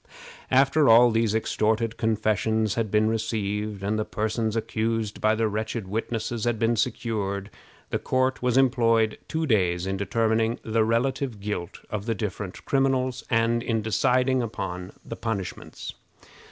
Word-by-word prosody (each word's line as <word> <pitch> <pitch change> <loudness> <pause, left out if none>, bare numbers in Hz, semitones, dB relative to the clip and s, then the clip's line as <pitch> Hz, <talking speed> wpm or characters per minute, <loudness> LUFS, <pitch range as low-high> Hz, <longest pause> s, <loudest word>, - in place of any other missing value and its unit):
After 140 +2 +4
all 120 +1 +7
these 110 -1 +1
extorted 110 0 0
confessions 110 -1 +1
had 115 -2 -1
been 105 +1 +3
received, 105 -2 -2
and 105 +2 0
the - - +1
persons 110 +1 -2
accused 110 -1 -2
by 110 0 +3
the 110 0 +1
wretched 110 0 -3
witnesses 115 +2 -2
had 120 -1 +1
been 115 +1 +2
secured, 105 -4 -2 0.4
the - - 0
court 130 0 0
was 125 0 +1
employed 115 -4 +3
two 160 0 -1
days 90 - +1
in 95 0 -2
determining 110 +3 +1
the 110 0 +1
relative 120 +1 0
guilt 100 -4 -5
of 105 +1 -4
the 115 - 0
different 100 -2 -5
criminals, 130 -2 +1
and 115 0 +2
in 115 -2 -1
deciding 125 +4 +2
upon 95 -5 -5
the - - -6
punishments. 100 -5 -5
110 Hz, 145 wpm, -26 LUFS, 105-120 Hz, 0.4 s, all